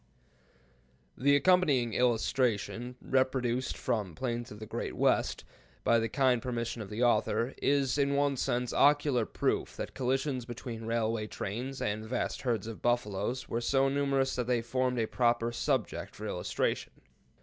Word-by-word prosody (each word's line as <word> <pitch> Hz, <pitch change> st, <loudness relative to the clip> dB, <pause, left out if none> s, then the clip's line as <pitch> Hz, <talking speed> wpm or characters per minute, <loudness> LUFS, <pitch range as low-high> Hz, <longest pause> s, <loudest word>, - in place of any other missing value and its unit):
The 140 Hz, +2 st, +4 dB
accompanying 145 Hz, -8 st, +3 dB
illustration, 120 Hz, 0 st, 0 dB
reproduced 130 Hz, -1 st, 0 dB
from 110 Hz, -6 st, -1 dB
the 85 Hz, -, -13 dB
"Plains 120 Hz, -1 st, -3 dB
of 105 Hz, -, -9 dB
the 110 Hz, -, -8 dB
Great -, -, -4 dB
West," -, -, +1 dB, 0.4 s
by 115 Hz, -, +4 dB
the 115 Hz, 0 st, -1 dB
kind 130 Hz, -1 st, +2 dB
permission 120 Hz, -1 st, -3 dB
of 100 Hz, -, -7 dB
the 110 Hz, +3 st, -1 dB
author, 120 Hz, +1 st, +2 dB
is, 140 Hz, -1 st, +2 dB
in 140 Hz, 0 st, +2 dB
one 140 Hz, 0 st, +2 dB
sense, 125 Hz, -1 st, -1 dB
ocular 145 Hz, -5 st, +3 dB
proof -, -, -1 dB
that -, -, -5 dB
collisions 130 Hz, 0 st, -1 dB
between 120 Hz, -1 st, -7 dB
railway 115 Hz, -1 st, 0 dB
trains 125 Hz, +7 st, -4 dB
and 105 Hz, +1 st, -1 dB
vast 120 Hz, +3 st, -2 dB
herds 120 Hz, -4 st, -1 dB
of 115 Hz, -1 st, -7 dB
buffaloes 120 Hz, +1 st, -1 dB
were 115 Hz, -, -2 dB
so 135 Hz, +3 st, +2 dB
numerous 135 Hz, -1 st, +1 dB
that 125 Hz, -1 st, -1 dB
they 120 Hz, -2 st, +1 dB
formed 125 Hz, +1 st, 0 dB
a 115 Hz, -, +2 dB
proper 120 Hz, 0 st, +1 dB
subject 120 Hz, -, -2 dB
for -, -, -7 dB
illustration. -, -, -2 dB
125 Hz, 155 wpm, -31 LUFS, 115-135 Hz, 0.4 s, The